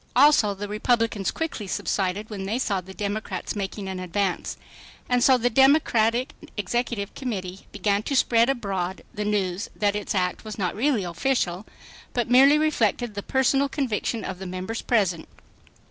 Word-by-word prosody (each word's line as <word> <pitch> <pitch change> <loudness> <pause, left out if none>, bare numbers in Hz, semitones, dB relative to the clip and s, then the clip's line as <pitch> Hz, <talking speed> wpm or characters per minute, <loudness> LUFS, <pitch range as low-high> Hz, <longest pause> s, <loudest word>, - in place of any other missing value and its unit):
Also 250 -7 +5
the 205 +1 -5
Republicans 220 -1 0
quickly 315 -11 -4
subsided 195 +2 -1
when 195 -2 -5
they 215 +5 -1
saw 200 -7 0
the 185 +1 -12
Democrats 205 -1 -4
making 200 0 -4
an 190 -1 -4
advance. 185 +1 -2 0.5
And 245 -1 +2
so 260 -1 +6
the 245 0 +1
Democratic 255 -1 +3 0.2
Executive 210 0 -2
Committee 195 -7 -5
began 205 -1 0
to 275 - -2
spread 235 -1 +4
abroad 195 -8 -2
the 210 - -3
news 195 -3 -1
that 205 -1 +1
its 210 +1 -3
act 180 -1 0
was 215 -1 -7
not 185 -4 -1
really 245 -2 +1
official, 180 +1 -1 0.5
but 240 -1 -1
merely 275 +4 +7
reflected 245 -7 +1
the 200 - -4
"personal 270 +4 +2
conviction" 235 -5 -2
of 185 -1 -5
the 190 - -6
members 185 +5 -4
present. 190 -8 +1
210 Hz, 160 wpm, -25 LUFS, 190-245 Hz, 0.5 s, merely